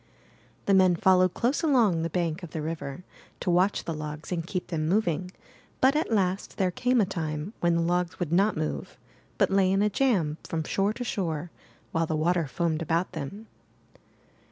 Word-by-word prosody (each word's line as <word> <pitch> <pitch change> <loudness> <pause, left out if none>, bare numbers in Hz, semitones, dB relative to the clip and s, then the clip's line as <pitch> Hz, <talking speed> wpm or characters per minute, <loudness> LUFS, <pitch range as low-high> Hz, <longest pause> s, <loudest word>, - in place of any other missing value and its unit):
The 200 - +3
men 185 -2 +5
followed 185 +1 +4
close 250 +5 +1
along 235 - +3
the 165 - -1
bank 170 0 -1
of 175 - -8
the 155 - -4
river, 155 0 -5 0.4
to 180 - 0
watch 185 +3 +2
the 165 - -3
logs 150 +1 -6
and 170 -2 -2
keep 185 -2 -4
them 155 -2 -1
moving; 180 -3 +1 0.5
but 265 +2 +4
at 305 -5 0
last 190 -3 0
there 185 -2 +1
came 250 +6 +1
a 210 - +4
time 160 -1 -4
when 170 -1 +2
the 170 - +2
logs 175 0 0
would 175 -4 -2
not 195 +5 +3
move, 70 -2 -4 0.4
but - - +2
lay 195 -1 +3
in 195 +1 +3
a 210 - +2
jam 190 - +1
from 160 -1 -3
shore 200 +5 0
to 245 - -5
shore 170 -7 -3 0.4
while 165 0 0
the 160 - -1
water 165 +1 +1
foamed 165 +2 -1
about 165 +3 0
them. 175 +7 -6
175 Hz, 190 wpm, -27 LUFS, 160-195 Hz, 0.5 s, men